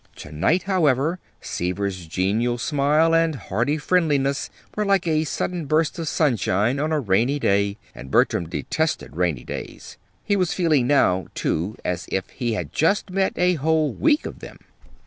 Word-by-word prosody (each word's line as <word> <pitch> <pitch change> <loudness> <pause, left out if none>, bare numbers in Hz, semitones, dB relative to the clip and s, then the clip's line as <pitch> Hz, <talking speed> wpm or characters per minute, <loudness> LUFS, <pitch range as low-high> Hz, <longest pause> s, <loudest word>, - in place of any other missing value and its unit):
To 75 - -10
night, 120 - +1
however, 165 -3 +1 0.2
Seaver's 90 0 -3
genial 105 +8 0
smile 150 +5 +2
and 165 -1 +3
hearty 120 +5 -1
friendliness 150 -4 +1 0.3
were 210 - 0
like 195 -3 +2
a 155 -1 +1
sudden 170 +1 -3
burst 155 +3 +1
of 165 - -3
sunshine 120 - +1
on 155 +2 -1
a 155 - +2
rainy 120 +4 +1
day 100 -5 +1 0.2
and 65 - -10
Bertram 80 +4 +2
detested 155 - -2
rainy 85 -7 0
days. - - -8 0.3
He 205 - +2
was 185 -4 0
feeling 155 -8 +2
now, 95 - +3
too, 90 +7 -2
as 90 -1 -2
if 95 - -1
he 120 -3 -2
had 110 - -4
just 190 +4 +1
had 190 +1 0
a 180 0 +3
whole 155 -1 +2
week 310 0 +2
of - - -7
them. - - -11
145 Hz, 165 wpm, -23 LUFS, 100-165 Hz, 0.3 s, and